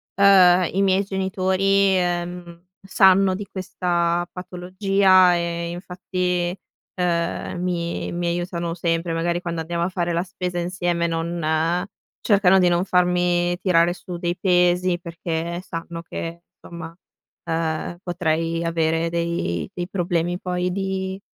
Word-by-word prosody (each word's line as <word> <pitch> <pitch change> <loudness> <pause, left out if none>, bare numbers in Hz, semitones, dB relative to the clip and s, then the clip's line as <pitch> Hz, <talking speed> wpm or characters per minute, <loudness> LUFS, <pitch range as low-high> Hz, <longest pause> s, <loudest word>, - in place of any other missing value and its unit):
ehm, 185 -3 +6
i 195 - +1
miei 195 0 +3
genitori, 190 0 +1
ehm, 175 -1 -3 0.2
sanno 190 -1 +4
di 205 +1 -6
questa 175 -2 -1
patologia 185 0 +3
e, 170 0 -2
infatti, 180 0 -2 0.4
ehm, 175 0 -1
mi 170 -2 -2
mi 175 0 -2
aiutano 170 -1 -2
sempre. 165 0 -1
Magari, 170 +1 -1
quando 170 -2 -3
andiamo 170 +1 -2
a 175 - 0
fare 175 -2 -2
la 170 +1 0
spesa 180 -2 -5
insieme, 175 -1 -1
non 165 +1 -1 0.4
cercano 195 -3 +4
di 180 -1 +4
non 175 +2 +1
farmi 175 -1 +2
tirare 175 -1 +3
su 180 -1 -8
dei 175 0 -2
pesi 180 -1 +2
perché 170 0 -4
sanno 165 -1 -6
che, 170 0 -6 0.2
somma, 165 -1 -9 0.5
ehm, 165 +1 -2
potrei 165 -1 -1
avere 165 0 0
dei 170 - -2
dei 175 0 -4
problemi 175 -2 -1
poi 180 0 -2
di 190 0 -3
175 Hz, 125 wpm, -22 LUFS, 170-185 Hz, 0.5 s, ehm